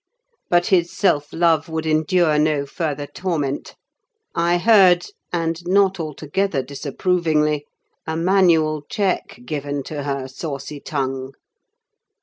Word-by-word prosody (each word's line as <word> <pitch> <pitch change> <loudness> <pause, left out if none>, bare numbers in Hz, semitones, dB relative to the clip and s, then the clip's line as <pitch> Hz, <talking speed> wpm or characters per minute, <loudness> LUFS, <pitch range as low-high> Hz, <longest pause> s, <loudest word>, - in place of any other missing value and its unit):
But 175 0 +3
his 175 -3 +2
self 145 -7 +1
love 165 -2 +2
would 160 0 -3
endure 155 0 +2
no 150 -2 +1
further 145 0 -3
torment: 145 -5 -3 0.6
I 170 +1 +2
heard, 185 -3 +5 0.3
and 165 -1 -1
not 195 0 +3
altogether 155 +1 -2
disapprovingly, 150 +1 0 0.4
a 160 0 -2
manual 165 -4 +3
check 200 - -1
given 145 0 -3
to 150 +1 -5
her 140 -2 -3
saucy 140 +1 -6
tongue. 135 -2 -3
155 Hz, 115 wpm, -21 LUFS, 145-175 Hz, 0.6 s, heard